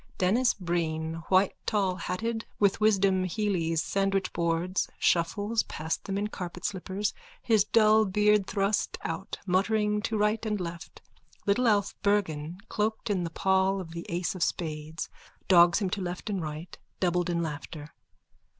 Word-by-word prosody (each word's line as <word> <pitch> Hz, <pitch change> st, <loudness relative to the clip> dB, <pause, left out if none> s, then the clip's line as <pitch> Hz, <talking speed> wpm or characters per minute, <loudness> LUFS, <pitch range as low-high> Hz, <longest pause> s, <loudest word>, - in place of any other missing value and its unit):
_(Denis 230 Hz, +7 st, +2 dB
Breen, 165 Hz, -2 st, -2 dB
whitetallhatted, 195 Hz, +3 st, 0 dB
with 200 Hz, 0 st, +2 dB
Wisdom 195 Hz, -3 st, +3 dB
Hely's 175 Hz, -5 st, 0 dB
sandwichboards, 185 Hz, -2 st, 0 dB
shuffles 205 Hz, +6 st, +1 dB
past 160 Hz, +1 st, -4 dB
them 195 Hz, 0 st, -2 dB
in 205 Hz, -, 0 dB
carpet 180 Hz, -4 st, -6 dB
slippers, 195 Hz, +2 st, -2 dB, 0.3 s
his 220 Hz, -4 st, +3 dB
dull 215 Hz, 0 st, +5 dB
beard 210 Hz, 0 st, +3 dB
thrust 200 Hz, +1 st, 0 dB
out, 165 Hz, +4 st, -4 dB
muttering 210 Hz, +3 st, +1 dB
to 220 Hz, +1 st, -1 dB
right 210 Hz, +1 st, +1 dB
and 210 Hz, -2 st, -1 dB
left. 170 Hz, -1 st, -7 dB, 0.4 s
Little 220 Hz, +5 st, +2 dB
Alf 205 Hz, -3 st, +2 dB
Bergan, 175 Hz, -6 st, 0 dB
cloaked 215 Hz, 0 st, -1 dB
in 185 Hz, -3 st, 0 dB
the 170 Hz, -, -3 dB
pall 190 Hz, +2 st, +2 dB
of 170 Hz, -3 st, -7 dB
the 170 Hz, 0 st, -7 dB
ace 175 Hz, +1 st, -1 dB
of 185 Hz, -, -8 dB
spades, 155 Hz, -1 st, -2 dB, 0.4 s
dogs 175 Hz, -2 st, +6 dB
him 195 Hz, -3 st, 0 dB
to 200 Hz, -, -2 dB
left 180 Hz, +4 st, -4 dB
and 195 Hz, -3 st, -1 dB
right, 155 Hz, +2 st, -7 dB, 0.2 s
doubled 180 Hz, -1 st, +1 dB
in 170 Hz, -1 st, 0 dB
laughter.) 150 Hz, -1 st, -7 dB
190 Hz, 140 wpm, -28 LUFS, 170-210 Hz, 0.4 s, dogs